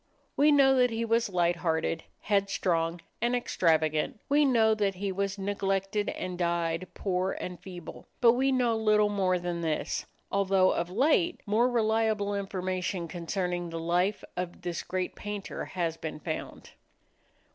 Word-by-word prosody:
We 295 +2 +5
know 275 -2 +6
that 250 -1 +4
he 230 0 -2
was 230 0 +1
light 175 -2 +1
hearted, 165 -1 -1 0.2
headstrong 180 -4 0 0.2
and 240 +1 +2
extravagant. 160 -7 +1
We 290 +1 +4
know 225 -4 +4
that 200 -3 0
he 195 +1 -2
was 195 +1 -2
neglected 195 +1 -1
and 180 -1 -5
died 170 0 0
poor 185 -1 -1
and 180 -1 -6
feeble. 180 -3 -10
But 235 -1 +7
we 265 +3 +2
know 245 -3 +2
little 215 -1 +3
more 190 -3 +1
than 175 -1 -3
this, 160 -2 -2 0.2
although 195 -1 +3
of 170 +1 -1
late 305 - +2
more 225 +4 +3
reliable 220 -3 +1
information 185 -2 -2
concerning 175 +1 -3
the 165 0 -5
life 175 +5 0
of 180 0 -5
this 175 -2 -3
great 185 -1 -3
painter 205 -1 -5
has 170 -3 -2
been 155 -2 -6
found. 160 0 -6
195 Hz, 150 wpm, -29 LUFS, 175-220 Hz, 0.2 s, But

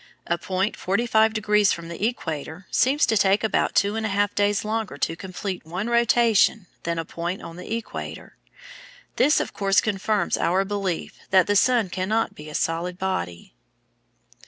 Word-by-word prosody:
A 170 0 -1
point 190 +2 -1
forty 200 +6 -1
five 220 -2 +4
degrees 210 -1 +2
from 170 -1 -4
the 170 +3 -6
equator 160 - -5
seems 280 +4 +3
to 220 - +1
take 200 +1 +3
about 220 - +1
two 200 +2 +2
and 225 - -2
a 220 - -1
half 205 +1 +1
days 205 0 +1
longer 220 -1 -2
to 165 - -1
complete 185 +1 -5
one 180 +8 -4
rotation 235 -3 +3 0.2
than 170 0 -2
a 165 - -2
point 170 +4 -4
on 165 - -8
the 180 +4 -9
equator. 230 - -7 0.8
This, 295 +4 +4
of - - -3
course, 195 -1 +3
confirms 210 0 0
our 185 +3 +2
belief 195 -4 -3
that 190 -2 +5
the 205 - +1
sun 225 -2 +3
cannot 210 +5 0
be 150 0 -10
a 150 - -8
solid 170 +2 -1
body. 90 - -4
195 Hz, 175 wpm, -24 LUFS, 180-220 Hz, 0.8 s, that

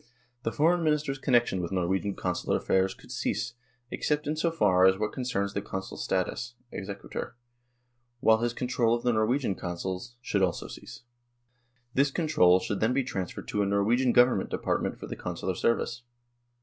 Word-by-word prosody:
The 115 - -1
Foreign 170 +5 +3
Minister's 150 -3 0
connection 120 -8 +2
with 85 - -4
Norwegian 95 +2 0
Consular 90 -1 -1
affairs 95 0 +1
should - - -14
cease, - - -2 0.4
except 150 0 -1
in 150 - -1
so 165 +2 +1
far 95 - +4
as 95 0 +4
what 105 +1 -2
concerns 100 -6 -2
the 100 - -1
Consul's 95 0 -5
status 115 +6 -2 0.2
(exequatur), 100 +4 -6 0.8
while 110 -1 +5
his 120 +1 0
control 120 -2 +1
of 120 - -5
the 120 - +2
Norwegian 110 +1 +1
Consuls 95 +6 -5
should 105 -5 -1
also 90 -3 0
cease. - - -10 0.9
This 140 +2 +3
control 135 - +4
should 100 - -3
then 110 +3 +2
be 135 +1 +2
transferred 95 -7 -5
to 105 - 0
a - - +2
Norwegian 115 +6 +2
Government 125 +1 +4
department - - -1
for - - -8
the - - -6
Consular - - -3
service." 120 +1 0
115 Hz, 165 wpm, -28 LUFS, 95-130 Hz, 0.9 s, while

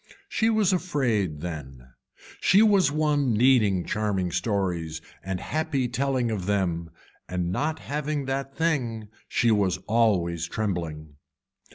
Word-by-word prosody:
She 225 - +2
was 215 -4 +3
afraid 120 - 0
then, 65 -7 -7 0.5
she 200 +4 +5
was 200 -8 +4
one 145 -4 +1
needing 105 -6 +3
charming 100 -4 -1
stories 90 -4 -1 0.2
and 95 0 -3
happy 150 - -1
telling 125 -1 0
of 100 -4 -3
them 85 -5 0 0.4
and 90 -1 -1
not 155 +10 -1
having 150 -1 -3
that 135 +1 -3
thing 120 -10 -1 0.2
she 120 -2 +2
was 100 -4 +2
always 90 -7 +1
trembling. 80 -8 -4
110 Hz, 125 wpm, -26 LUFS, 90-140 Hz, 0.5 s, she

